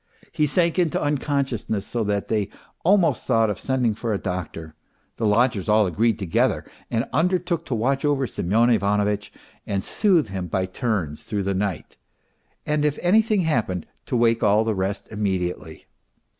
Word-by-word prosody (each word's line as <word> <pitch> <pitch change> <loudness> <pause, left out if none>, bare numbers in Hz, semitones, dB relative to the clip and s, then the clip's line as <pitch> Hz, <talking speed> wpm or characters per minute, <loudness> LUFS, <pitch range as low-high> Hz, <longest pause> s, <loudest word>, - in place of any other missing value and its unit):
He 150 - +1
sank 170 +4 +2
into 170 -4 +1
unconsciousness, 140 -7 -1
so 120 -2 -2
that 100 -1 -1
they 105 -2 0 0.3
almost 185 -1 +3
thought 115 -4 +3
of - - -5
sending 130 -4 0
for 115 +1 -3
a - - 0
doctor; 90 -4 -5 0.4
the 110 - 0
lodgers 110 -2 +2
all 105 0 +5
agreed 110 +6 +1
together 95 -6 0 0.2
and 115 +3 -1
undertook 170 +2 0
to 125 - -1
watch 135 +5 0
over 145 -2 +1
Semyon 115 +3 +1
Ivanovitch 105 -1 +1 0.4
and 100 -2 -1
soothe 180 - +2
him 95 -2 -4
by 95 +2 -1
turns 95 - -2
through 105 -2 -3
the 100 +1 -1
night, 95 -4 -3 0.7
and 150 0 0
if 150 -1 +1
anything 215 +2 +3
happened 115 - -1 0.2
to 125 - 0
wake 115 -1 +3
all 105 +1 +4
the 110 -1 0
rest 95 +1 -3
immediately. 95 -4 -3
110 Hz, 160 wpm, -23 LUFS, 100-140 Hz, 0.7 s, all